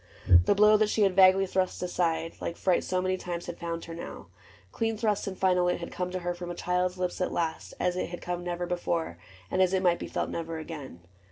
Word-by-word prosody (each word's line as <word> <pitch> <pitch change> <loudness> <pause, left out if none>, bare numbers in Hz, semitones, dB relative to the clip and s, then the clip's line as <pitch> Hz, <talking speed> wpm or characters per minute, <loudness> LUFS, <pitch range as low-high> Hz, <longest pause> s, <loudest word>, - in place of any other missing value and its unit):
The - - +4
blow 210 +1 +6
that 215 0 +2
she 215 - +2
had 195 -2 +2
vaguely 190 0 +6
thrust 185 -1 -1
aside 165 -2 -1
Like 170 - -4
fright 185 -2 +2
so 185 0 -1
many 185 0 0
times 175 -1 -5
had 170 - -7
found 170 -1 -4
her 165 - -8
now: 170 - -8 0.4
Clean 225 -1 -1
thrust 210 -3 0
and 190 -1 -4
final 180 -1 +3
it 180 - 0
had 170 - -6
come 180 0 -3
to 185 0 -3
her 175 0 -1
From 175 0 -7
a 175 - -4
child's 180 +1 0
lips 180 0 -2
at 180 - 0
last, 165 -2 -3
as 180 0 +1
it 185 - -2
had 175 - -6
come 175 0 -4
Never 175 0 -3
before, 170 - -2 0.3
and 185 - +2
as 185 0 +3
it 190 - 0
might 175 -1 +3
be - - -5
felt - - -2
Never 165 -1 -4
again. 150 - -8
180 Hz, 245 wpm, -28 LUFS, 170-185 Hz, 0.4 s, blow